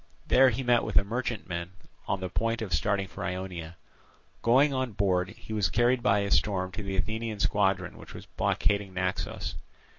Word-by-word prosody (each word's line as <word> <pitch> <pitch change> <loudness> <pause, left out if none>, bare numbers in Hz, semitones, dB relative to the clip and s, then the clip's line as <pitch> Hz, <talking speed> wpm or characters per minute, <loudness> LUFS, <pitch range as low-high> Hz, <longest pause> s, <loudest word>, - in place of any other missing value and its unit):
There 130 0 +6
he 125 +3 -2
met 120 -1 +3
with - - -4
a - - +6
merchantman 100 -6 -3 0.3
on 95 -1 -1
the 95 - -3
point 115 +3 -1
of 95 -6 -4
starting 100 +4 +1
for - - -8
Ionia. 90 -3 -5 0.6
Going 135 +5 +4
on 130 -3 -1
board, 95 -2 +1
he 110 0 -9
was 105 -5 +1
carried 120 +5 +2
by 100 -1 +3
a 100 0 -2
storm 95 -2 +1
to 105 - -6
the 95 -1 -3
Athenian 110 +2 -2
squadron 95 -4 +1
which - - -11
was - - -9
blockading 100 -2 0
Naxos. 90 0 -2
100 Hz, 180 wpm, -28 LUFS, 95-115 Hz, 0.6 s, There